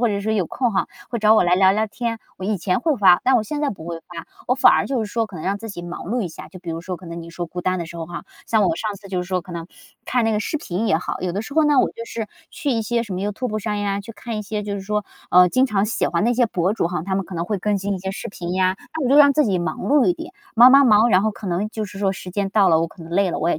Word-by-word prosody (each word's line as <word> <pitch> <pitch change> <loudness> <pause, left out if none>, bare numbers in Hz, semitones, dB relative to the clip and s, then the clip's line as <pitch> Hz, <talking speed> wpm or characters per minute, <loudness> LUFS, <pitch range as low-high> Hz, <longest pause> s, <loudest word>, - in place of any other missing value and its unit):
或 240 - +3
者 200 -1 -1
说 215 +2 -1
有 200 -5 0
空 245 +4 -1
哈， 195 - 0 0.2
会 235 - -3
找 215 0 +6
我 215 - +4
来 175 0 +4
聊 190 +1 +5
聊 215 +3 +1
天。 230 +1 -3 0.2
我 185 - -6
以 205 +1 0
前 180 +3 0
会 310 +1 +1
发， 190 -5 +6
但 260 0 +4
我 230 - +2
现 295 +6 -4
在 295 -2 +1
不 185 -5 -9
会 170 -1 -5
发， 170 0 -10 0.2
我 250 - +2
反 - - +7
而 - - +2
就 265 -1 -1
是 205 - -9
说 230 -1 0
可 200 - -11
能 155 - -7
让 195 +2 0
自 225 +2 -8
己 175 -3 -7
忙 175 0 -7
碌 235 +4 -1
一 185 - -3
下， 160 - -10
就 185 - -12
比 175 -2 -7
如 165 - -5
说 180 +1 -5
可 180 - -13
能 170 0 -6
你 165 - -10
说 175 +1 -5
孤 180 +2 -6
单 185 +1 0
的 170 - -4
时 170 - -10
候 165 - -4
哈， 175 0 -7 0.2
像 220 -2 +3
我 330 - +2
上 215 -9 -3
次 200 0 -14
就 185 -2 -2
是 180 - -10
说 185 -1 0
可 180 0 -11
能 170 0 -6 0.4
看 245 -2 +1
那 225 - +2
个 210 - 0
视 310 - -2
频 220 - -3
也 160 - +3
好， - - -5
有 180 - -1
的 195 +4 -2
时 255 +6 -8
候 315 0 +4
呢， 295 -2 +4
我 - - +4
就 230 - -7
是 230 -1 -5 0.2
去 335 -4 -3
一 225 -2 0
些 235 +1 -1
什 205 - -7
么 180 - -3
Youtube 215 +2 -3
上 210 0 -2
呀， 200 -1 -1
去 205 - -10
看 230 0 -6
一 - - -3
些 210 0 -4
就 205 -1 -3
是 200 - -4
说， 210 +1 -2 0.3
呃， 180 0 +7
经 255 +8 +3
常 210 -4 +1
喜 220 - -1
欢 170 +3 0
那 240 +1 +2
些 240 0 +3
博 185 -2 0
主 195 - 0
哈， 175 -3 -3
他 190 0 -2
们 195 0 -1
可 190 - -8
能 170 0 -2
会 205 +3 -2
更 210 +2 0
新 200 +1 -2
一 - - -4
些 190 +1 -4
视 195 - -6
频 175 -3 -6
呀。 185 0 +1 0.2
那 - - -2
我 - - +1
就 280 - +5
让 285 -1 +8
自 300 +2 +3
己 190 -4 +1
忙 175 - -3
碌 285 -1 +3
一 360 - +4
点， 330 +2 -9 0.2
忙 240 +3 +9
忙 275 +1 +7
忙， 220 0 +5
然 190 -1 +4
后 220 - +1
可 205 0 -9
能 185 +4 -1
就 220 -1 -3
是 195 0 -10
说 195 -1 +1
时 185 -1 -8
间 200 +1 -1
到 195 -1 +4
了， 160 -2 +4
我 165 - +1
可 165 - -14
能 165 - -11
累 195 0 +2
了， - - -3
我 165 - 0
也 - - 0
200 Hz, 385 characters per minute, -21 LUFS, 180-230 Hz, 0.4 s, 忙